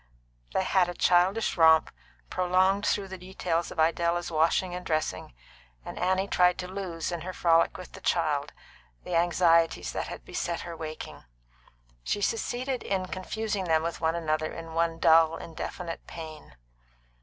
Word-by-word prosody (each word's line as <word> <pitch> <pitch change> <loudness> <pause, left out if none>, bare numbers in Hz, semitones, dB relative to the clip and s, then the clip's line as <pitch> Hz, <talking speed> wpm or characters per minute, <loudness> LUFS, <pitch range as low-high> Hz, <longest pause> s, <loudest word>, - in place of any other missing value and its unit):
They 190 - +1
had 185 -1 +2
a 175 - -5
childish 185 +7 +2
romp, 160 -1 +6 0.4
prolonged 185 +2 +2
through 200 -1 0
the 190 -1 -7
details 180 -2 -2
of - - -8
Idella's 170 +2 +1
washing 165 +3 +2
and 180 0 -5
dressing, 155 - -2 0.5
and - - -7
Annie 185 +2 +1
tried 180 -2 +3
to 180 -1 -5
lose, 185 -3 -4
in 170 -2 -4
her 185 +2 -5
frolic 165 -1 +3
with - - -10
the - - -12
child, - - 0 0.5
the - - -6
anxieties 170 -1 +3
that - - -3
had - - -8
beset 170 -1 -3
her 170 -1 -7
waking; 155 -1 -7 0.8
she - - -1
succeeded 245 +4 -1
in 185 -2 -2
confusing 205 +1 -3
them 160 -2 +2
with 170 0 -4
one 160 0 +1
another 155 -2 -1
in 165 -1 -8
one 165 0 0
dull, 165 0 +5
indefinite 165 +1 -6
pain. 155 - -9
175 Hz, 155 wpm, -28 LUFS, 165-185 Hz, 0.8 s, romp